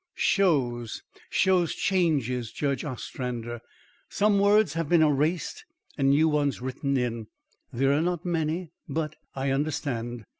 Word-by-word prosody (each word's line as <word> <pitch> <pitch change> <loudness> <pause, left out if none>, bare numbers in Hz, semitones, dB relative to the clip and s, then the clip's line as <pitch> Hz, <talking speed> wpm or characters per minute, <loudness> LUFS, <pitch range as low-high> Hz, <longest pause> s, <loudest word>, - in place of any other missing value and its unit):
"Shows 125 - +1 0.3
shows 185 -3 +2
changes, 135 - 0
Judge 140 -2 -1
Ostrander. 120 -3 -5 0.5
Some 205 -1 +2
words 205 -4 +4
have 165 -2 -2
been 170 -2 +5
erased 155 +3 0 0.3
and 135 0 +2
new 150 +3 +4
ones 145 -2 +1
written 135 +2 -2
in. 115 -3 -2 0.4
They 130 +3 0
are 140 +3 +3
not 175 0 -1
many, 165 0 -1 0.2
but 155 -1 -2
" - - -40
"I 135 0 -1
understand. 120 -5 -2
145 Hz, 135 wpm, -27 LUFS, 125-165 Hz, 0.5 s, been